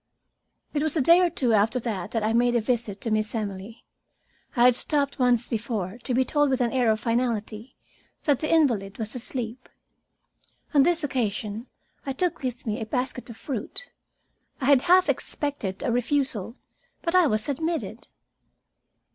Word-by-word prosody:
It 290 - 0
was 315 +1 0
a - - +3
day 335 +6 +6
or 355 - +3
two 255 -8 +1
after 220 +4 +3
that 200 -6 -3
that 225 -1 -2
I 220 +1 +1
made 240 +1 +3
my - - +4
visit 225 -3 -1
to 225 - -2
Miss 215 +1 0
Emily. 205 0 -5 0.7
I 240 - +4
had 250 0 +7
stopped 280 +3 0
once 245 -2 +3
before, 225 -3 -3
to 250 0 -2
be 260 +1 +3
told 290 0 +2
with 260 -1 +1
an 240 -2 +1
air 250 -3 +2
of 215 0 +2
finality 230 -1 -2 0.5
that 290 -4 +2
the 310 - -2
invalid 235 -12 +2
was 220 -2 -4
asleep. 245 0 -6 1.0
On 285 - +6
this 340 +2 +2
occasion 225 -4 -2 0.4
I 270 - -3
took 355 +4 -1
with 250 -2 -3
me 220 +1 -2
a - - -2
basket 250 +2 -3
of 230 - -9
fruit. 275 - -4 0.7
I 260 - -3
had 275 -2 +5
half 365 +4 +5
expected 280 - -2
a 260 - 0
refusal, 245 -3 -1 0.5
but 335 - -1
I 365 -3 +5
was 215 -4 0
admitted. 320 +4 -3
245 Hz, 170 wpm, -25 LUFS, 220-280 Hz, 1.0 s, had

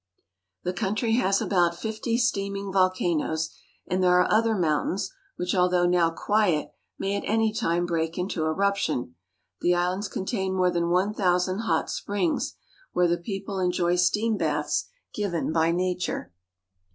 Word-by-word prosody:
The 180 - -1
country 210 +5 -1
has 195 -5 +2
about 175 -3 +2
fifty 220 +3 -2
steaming 200 -5 -1
vol 185 -1 +5
canoes, 160 -3 -1 0.3
and 185 +1 -1
there 180 0 +5
are - - +4
other 225 +1 +3
mountains 180 +3 0 0.2
which 180 0 -2
although 180 -1 +3
now 175 -1 +3
quiet 180 -2 +1 0.3
may 195 +1 -1
at 200 - -3
any 220 0 +2
time 175 -4 0
break 165 -1 -1
into 180 -3 -2
eruption. 195 - 0 0.5
The 175 0 +2
islands 180 +3 0
contain 190 -1 -2
more 180 -1 +3
than 170 -1 0
one 185 +4 +2
thousand 185 0 +1
hot 225 - 0
springs, 195 -5 -1 0.4
where 180 0 +3
the 170 0 +1
people 195 +1 -4
enjoy 180 -1 +1
steam 210 +5 +2
baths - - -1 0.2
given 175 -6 -2
by 165 0 +3
nature. 180 - -2
185 Hz, 150 wpm, -26 LUFS, 175-200 Hz, 0.5 s, vol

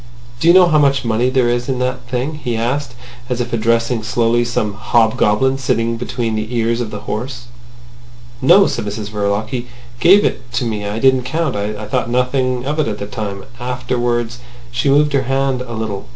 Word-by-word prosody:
"Do 160 - +1
you 170 - +8
know 185 -1 +8
how 155 -3 +3
much 140 -3 +2
money 115 +2 +1
there 130 -2 +2
is 120 +2 -1
in 130 - 0
that 125 0 -3
thing?" 130 +4 -2
he 120 -2 -1
asked, 125 +2 -2 0.3
as 125 -1 -1
if 120 0 -3
addressing 115 +1 +1
slowly 120 +1 +1
some 115 -3 -1
hobgoblin 115 +3 +2
sitting 115 -3 0
between 120 -1 -3
the 110 +3 -3
ears 115 +1 +1
of 115 - -3
the 105 -1 -7
horse. 120 +3 -5 1.0
"No," 195 +9 +6
said - - -2
Mrs 105 0 -5
Verloc. 105 +1 -1
"He 125 -2 -4 0.3
gave 195 +10 +6
it 125 -1 -3
to 125 - 0
me. 105 -3 -3
I 105 +2 -3
didn't 130 +2 +4
count. 155 0 -1
I 105 +1 -3
thought 105 - -1
nothing 125 0 0
of 150 +3 -2
it 155 - +1
at 105 -2 -3
the 100 - -5
time. 100 -2 -5
Afterwards—" 120 -1 -2 0.3
She 125 +3 0
moved 145 +1 +3
her 140 - +4
right 130 - -5
hand 135 -1 0
a 125 -2 -6
little. 110 -3 -4
120 Hz, 200 wpm, -17 LUFS, 110-130 Hz, 1.0 s, you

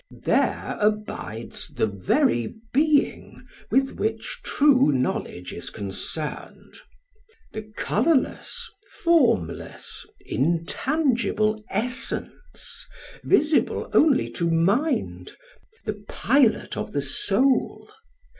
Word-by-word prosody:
There - - +1
abides 210 - -2
the - - +2
very 110 +3 +1 0.2
being 295 +1 +1 0.2
with 270 0 +1
which 450 +3 -2
true 275 - +4
knowledge 125 -8 -2
is 85 - -5
concerned; 105 +10 -5 0.8
the 215 0 -8
colourless, 335 - 0 0.4
formless, 255 - +1 0.2
intangible 215 - 0
essence, 240 +5 -4 0.4
visible 310 -5 +2
only 295 -4 +4
to 170 -1 -1
mind, 195 - 0 0.5
the 210 -1 -4
pilot 255 -2 +2
of - - -5
the 145 - 0
soul. 210 - +1
215 Hz, 80 wpm, -24 LUFS, -, 0.8 s, true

